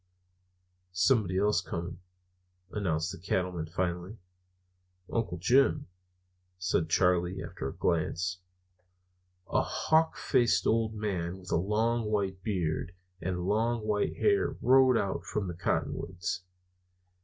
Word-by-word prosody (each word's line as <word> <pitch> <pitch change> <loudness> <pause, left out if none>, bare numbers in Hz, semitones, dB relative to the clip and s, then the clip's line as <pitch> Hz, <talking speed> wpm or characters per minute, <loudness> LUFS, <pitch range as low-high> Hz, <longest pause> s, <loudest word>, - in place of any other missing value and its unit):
"Somebody 95 0 +2
else 105 -2 +3
coming," 85 -1 -5 0.7
announced 85 -5 -1
the 95 - -8
Cattleman 90 -2 -1
finally. 90 +4 -3 1.0
"Uncle 105 -7 -1
Jim," 120 +6 +3 0.7
said 90 -3 0
Charley, 90 +1 +2
after 85 -7 -5
a - - -6
glance. 90 +2 0 1.1
A - - +3
hawk 160 +1 +1
faced 120 -7 +2
old 110 -1 +1
man 95 -4 -2
with 90 -1 -10
a - - +3
long 110 +6 +1
white 100 -3 -1
beard 90 -3 -2 0.3
and 90 -1 -2
long 110 +3 +1
white 105 -1 0
hair 405 -1 +2
rode 130 0 +5
out 100 -3 -1
from 100 -3 -3
the 90 - -4
cottonwoods. 85 +1 -2
95 Hz, 115 wpm, -30 LUFS, 90-110 Hz, 1.1 s, rode